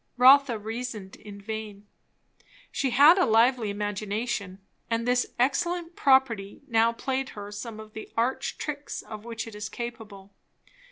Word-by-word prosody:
Rotha 260 -1 +7
reasoned 220 -2 -6
in 205 -1 -11
vain. 210 -1 -7 0.9
She 270 - 0
had 290 +9 +7
a 370 - +4
lively 230 0 +3
imagination; 205 0 -3 0.3
and 230 +1 -1
this 250 0 +2
excellent 335 +7 0
property 265 -8 +2
now 230 -2 +3
played 265 +2 -3
her 205 0 -7
some 215 +1 -7
of 215 0 -11
the 220 - -8
arch 240 +3 -1
tricks 290 -1 -5
of 215 0 -9
which 230 -1 -5
it 225 - -10
is 210 +1 -6
capable. 210 -5 -8
230 Hz, 145 wpm, -27 LUFS, 210-255 Hz, 0.9 s, Rotha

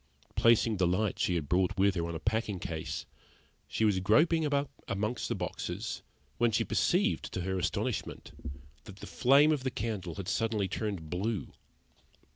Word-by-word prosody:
Placing 115 -2 +4
the 90 -1 +3
light 95 +3 0
she 90 - +1
had 80 -4 -2
brought 90 +3 +1
with 100 +1 +4
her 85 -2 -2
on 85 - -4
a - - -3
packing 110 +1 -1
case, 80 -2 -4 0.6
she 110 - 0
was 100 -3 +3
groping 155 - +4
about 145 -1 0 0.2
among 105 +5 -1
the - - -1
boxes, - - -4 0.4
when 120 0 +4
she 115 +2 +2
perceived, 200 - +1
to 90 - -2
her 95 +1 -1
astonishment, 85 -1 -2 0.5
that 100 - -10
the - - -10
flame 140 +4 +5
of 145 -4 0
the 130 - 0
candle 100 -8 -4
had 95 -3 -6
suddenly 110 0 0
turned 95 -8 -4
blue. 100 +3 -2
105 Hz, 170 wpm, -31 LUFS, 90-115 Hz, 0.6 s, flame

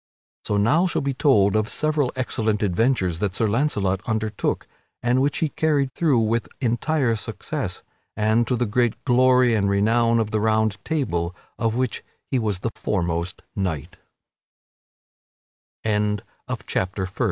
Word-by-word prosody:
So 105 - 0
now 150 - +3
shall 175 - -1
be 140 0 0
told 110 -8 +3
of 110 0 +1
several 150 -4 0
excellent 110 -4 -1
adventures 95 -3 +1
that 100 -2 -1
Sir 115 - +1
Launcelot 100 -6 +1
undertook, 110 -2 -1 0.4
and 125 +2 +2
which 140 +1 +1
he 160 - 0
carried 145 -3 +1
through 155 -7 +2
with 115 +1 0
entire 125 +1 +1
success, 105 - -4 0.3
and 110 +2 +2
to 125 - +1
the 120 0 0
great 120 +1 0
glory 125 -1 +4
and 100 -3 +2
renown 115 +4 +3
of 110 -2 -1
the 110 - 0
Round 110 -3 +1
Table, 90 - -1 0.2
of 115 -1 0
which 125 -2 -1 0.3
he 130 - +2
was 105 -5 -2
the 115 - -2
foremost 85 -3 -2
k 90 -8 -2
115 Hz, 135 wpm, -23 LUFS, 105-130 Hz, 0.4 s, glory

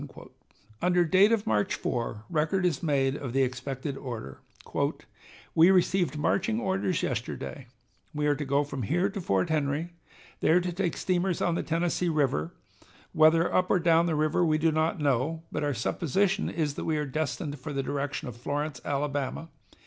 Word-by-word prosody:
Under 180 -1 +3
date 190 +6 +5
of 225 -2 +1
March 105 -2 +1
4 115 -2 -3
record 170 +3 0
is 165 -6 0
made 135 -4 +1
of 130 -5 -5
the 135 0 +3
expected 130 +2 -3
order: 120 - -7 1.1
"We 165 +3 +6
received 180 -5 +2
marching 195 +9 +1
orders 190 -4 -1
yesterday. 125 +1 -4 0.4
We 150 0 -2
are 145 - +4
to 145 +1 -4
go 140 +1 +1
from 140 -2 -5
here 175 - +1
to 200 -1 -5
Fort 95 - 0
Henry, 150 +2 -1 0.5
there 170 +3 +4
to 180 0 -2
take 180 -1 -1
steamers 180 -1 0
on 175 - +1
the 170 - -1
Tennessee 170 +2 0
River, 135 - 0 0.6
whether 160 +2 +4
up 180 0 +2
or - - +4
down 170 -1 +3
the 160 - 0
river 155 +3 +2
we 155 -2 +3
do 160 +1 +2
not 160 +3 0
know, 145 +3 0
but 150 - -2
our 145 -2 0
supposition 185 - 0
is 155 -3 -1
that - - -5
we 160 -1 0
are 150 - -1
destined 145 0 -3
for 140 +4 -6
the 135 -1 -2
direction 145 +2 -3
of 125 - -7
Florence, 145 +2 -3
Alabama. 145 +2 -2
155 Hz, 175 wpm, -28 LUFS, 135-175 Hz, 1.1 s, We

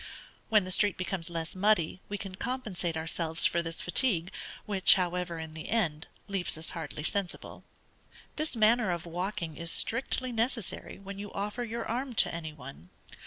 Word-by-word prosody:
When 215 -3 +5
the 185 - -5
street 205 +1 +5
becomes 185 -2 -3
less 165 -2 -4
muddy, 185 -3 +2
we 205 - -2
can 195 -2 -6
compensate 190 -7 -2
ourselves 160 0 -1
for 170 - +3
this 165 -1 -3
fatigue, 180 -2 +3 0.3
which, 200 -3 +7
however, 180 -2 -1
in 160 -1 -6
the 160 0 -7
end, 165 -9 +1 0.2
leaves 195 -5 -1
us 160 - -1
hardly 160 -3 -5
sensible. 195 +2 -2 0.7
This 310 -3 0
manner 220 -1 +4
of 175 -1 -2
walking 170 -1 -3
is 170 0 -2
strictly 255 +6 +1
necessary 230 -2 -2
when 195 0 -8
you 205 0 -6
offer 210 +5 -2
your 230 0 -4
arm 250 +2 -2
to - - +4
any 165 -2 -4
one. 135 - -11
185 Hz, 165 wpm, -30 LUFS, 165-215 Hz, 0.7 s, which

